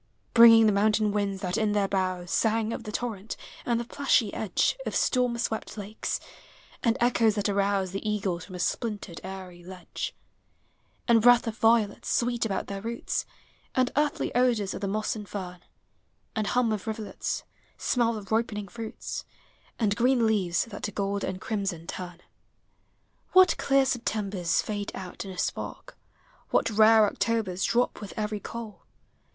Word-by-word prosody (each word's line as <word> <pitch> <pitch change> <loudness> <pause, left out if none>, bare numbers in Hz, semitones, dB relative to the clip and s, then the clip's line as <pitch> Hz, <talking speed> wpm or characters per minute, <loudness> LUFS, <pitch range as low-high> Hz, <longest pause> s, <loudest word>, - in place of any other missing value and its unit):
Bringing 230 -1 +9
the 215 - +5
mountain 210 +1 +2
winds 200 -2 -1
that 180 +3 -1
in 215 -1 +1
their 205 -1 +2
boughs 185 -2 -1
Sang 225 0 +1
of 230 - -6
the 210 - -5
torrent, 220 -3 -4 0.3
and 235 -1 +2
the - - -2
plushy 250 -5 +1
edge 210 -5 +1
Of - - -4
storm 250 -2 +2
swept 225 -3 -3
hikes; 210 0 -4 0.6
and 230 -2 +2
echoes 230 -3 +3
that 205 -1 0
arouse 200 -2 +1
The 195 - -4
eagles 190 -5 -1
from 185 - -10
a - - -6
splintered 205 -2 -3
eyrie 185 -2 -8
ledge; 185 +1 -6 0.9
And 235 -2 +5
breath 245 +1 +6
of 225 -2 -3
violets 225 -2 +2
sweet 240 -1 +1
about 195 -3 -2
their 200 0 -5
roots; 235 +2 -3 0.5
And 255 -1 +2
earthy 295 -1 0
odors 235 -5 +2
of - - -6
the 200 - -1
moss 215 +3 -1
and 210 -2 -8
fern; 180 -3 -6 0.8
And 215 -2 -1
hum 245 0 +2
of 215 0 -3
rivulets; 220 -1 -3 0.3
smell 235 -2 +1
of 200 -1 -10
ripening 215 -3 -1
fruits; 225 +2 -6 0.5
And 210 -3 +1
green 245 0 +3
leaves 195 -6 +1
that 220 -3 -9
to 210 - -3
gold 200 0 -2
and 185 0 -3
crimson 195 -7 -3
turn. 175 0 -7 1.1
What 370 0 +7
clear 275 -1 +3
Septembers 205 -8 0
fade 205 -1 -4
out 185 +1 -7
in - - -7
a 185 - -8
spark! - - -4 0.6
W - - +4
hat 225 - -3
rare 220 0 +7
Octobers 205 -3 -1
drop 245 -1 +1
with 205 - -8
every 210 -1 -2
coal 225 0 -8
210 Hz, 165 wpm, -27 LUFS, 195-230 Hz, 1.1 s, Bringing